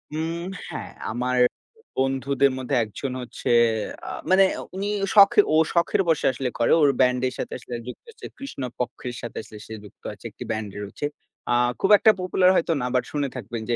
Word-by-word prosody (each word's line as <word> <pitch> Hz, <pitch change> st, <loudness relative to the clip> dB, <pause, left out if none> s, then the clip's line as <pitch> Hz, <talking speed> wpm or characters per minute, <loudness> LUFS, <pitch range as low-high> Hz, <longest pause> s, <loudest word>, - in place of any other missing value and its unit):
উম 165 Hz, +2 st, -2 dB, 0.3 s
হ্যাঁ। -, -, -6 dB, 0.2 s
আমার 125 Hz, +2 st, -1 dB, 0.6 s
বন্ধুদের 135 Hz, +1 st, +2 dB
মধ্যে 130 Hz, +1 st, -2 dB
একজন 120 Hz, +5 st, -5 dB
হচ্ছে 120 Hz, 0 st, -4 dB, 0.6 s
আ -, -, -4 dB, 0.2 s
মানে 190 Hz, +1 st, +6 dB, 0.3 s
উনি 195 Hz, +2 st, -2 dB, 0.3 s
শখ 200 Hz, -1 st, +8 dB, 0.2 s
ও -, -, +4 dB, 0.2 s
শখের 170 Hz, +2 st, +2 dB
বসে 160 Hz, -, +2 dB
আসলে 130 Hz, 0 st, -3 dB
করে। 115 Hz, -, +3 dB
ওর 145 Hz, -, +6 dB
ব্যান্ডের 125 Hz, 0 st, +2 dB
সাথে -, -, -4 dB
আসলে 120 Hz, -, -7 dB
যুক্ত 125 Hz, -, -8 dB
হচ্ছে 455 Hz, -, -12 dB
কৃষ্ণপক্ষের 125 Hz, -, -5 dB
সাথে 120 Hz, -, -7 dB
আসলে 105 Hz, -, -12 dB
সে 110 Hz, -, -9 dB
যুক্ত 105 Hz, -, -16 dB
আছে। -, -, -17 dB
একটি -, -, -9 dB
ব্যান্ড 110 Hz, -1 st, -3 dB
রয়েছে। 100 Hz, +8 st, -5 dB, 0.5 s
আ -, -, +4 dB, 0.3 s
খুব 195 Hz, -, +1 dB
একটা 220 Hz, -, +6 dB
popular 185 Hz, 0 st, +3 dB
হয়তো 165 Hz, -1 st, +2 dB
না, 125 Hz, -, -1 dB
বাট 125 Hz, -, +3 dB
শুনে 145 Hz, -2 st, -1 dB
থাকবেন 115 Hz, -1 st, -5 dB
যে 120 Hz, -, +2 dB
130 Hz, 180 wpm, -24 LUFS, 125-165 Hz, 0.6 s, শখ